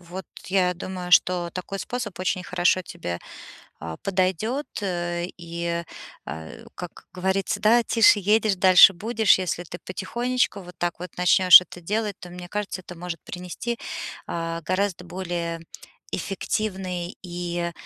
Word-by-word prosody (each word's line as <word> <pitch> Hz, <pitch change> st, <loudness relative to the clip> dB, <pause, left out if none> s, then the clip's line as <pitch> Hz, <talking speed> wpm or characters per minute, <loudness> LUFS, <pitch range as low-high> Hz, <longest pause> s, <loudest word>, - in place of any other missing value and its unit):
вот 175 Hz, 0 st, -8 dB, 0.2 s
я 180 Hz, -1 st, +2 dB
думаю, 180 Hz, 0 st, -6 dB
что 175 Hz, -1 st, +4 dB
такой 185 Hz, +3 st, -5 dB
способ 230 Hz, -3 st, -4 dB
очень 185 Hz, 0 st, 0 dB
хорошо 180 Hz, +1 st, +2 dB
тебе, 165 Hz, -, -5 dB, 0.6 s
а, 80 Hz, 0 st, -6 dB
подойдет, 195 Hz, -, 0 dB
э, 175 Hz, -2 st, -2 dB
и, 170 Hz, 0 st, -3 dB, 0.4 s
а, 80 Hz, +2 st, -7 dB, 0.3 s
как -, -, -9 dB
говорится, 190 Hz, +1 st, -1 dB
да: 230 Hz, +3 st, +5 dB
тише 230 Hz, -1 st, +5 dB
едешь, 210 Hz, +1 st, +3 dB
дальше 185 Hz, +1 st, +8 dB
будешь. 220 Hz, +2 st, +3 dB
Если 175 Hz, -1 st, -2 dB
ты 175 Hz, +1 st, -9 dB
потихонечку 235 Hz, +5 st, -1 dB
вот 180 Hz, -1 st, -12 dB
так 175 Hz, -1 st, -2 dB
вот 180 Hz, -1 st, -7 dB
начнёшь 180 Hz, 0 st, +8 dB
это 180 Hz, -, -11 dB
делать, 210 Hz, +3 st, -2 dB
то, 180 Hz, -, -10 dB
мне 175 Hz, 0 st, -9 dB
кажется, 205 Hz, -2 st, -3 dB
это 175 Hz, -1 st, -10 dB
может 175 Hz, -1 st, -6 dB
принести, 180 Hz, +7 st, -5 dB, 0.5 s
а, 165 Hz, 0 st, -3 dB
гораздо 185 Hz, +1 st, -1 dB
более 175 Hz, -2 st, -4 dB, 0.5 s
эффективный 185 Hz, -2 st, -3 dB
и 175 Hz, -1 st, -3 dB
180 Hz, 140 wpm, -25 LUFS, 175-195 Hz, 0.6 s, дальше